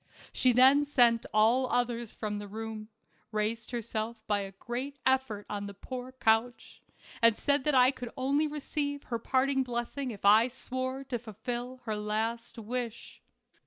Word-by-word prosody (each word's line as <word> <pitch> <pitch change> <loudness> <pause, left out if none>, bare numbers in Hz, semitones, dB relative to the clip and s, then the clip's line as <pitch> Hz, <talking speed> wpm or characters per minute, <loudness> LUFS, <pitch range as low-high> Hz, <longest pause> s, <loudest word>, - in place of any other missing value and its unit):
She 255 - +3
then 260 +4 +6
sent 240 -5 +3
all 235 +4 +3
others 240 -2 0
from 210 -1 -4
the 205 - -7
room, 220 +1 -6 0.4
raised 220 +1 -2
herself 230 -1 -3
by 205 -1 +1
a 195 -1 -5
great 250 +8 -5
effort 260 -6 +1
on 205 -1 -4
her 200 - -9
poor 255 +4 -7
couch, 225 -1 0 0.4
and 230 -1 +5
said 285 -2 +1
that 300 -2 +2
I 255 0 +6
could 250 -3 -7
only 280 +4 +1
receive 290 -1 -3
her 235 -2 -3
parting 265 +3 +1
blessing 250 +2 -3
if 205 -4 -7
I 215 +4 +7
swore 260 +1 -4
to 255 -3 -3
fulfill 245 +3 -6
her 215 -2 -1
last 220 +3 -2
wish. 235 +1 -5
240 Hz, 160 wpm, -30 LUFS, 220-260 Hz, 0.4 s, I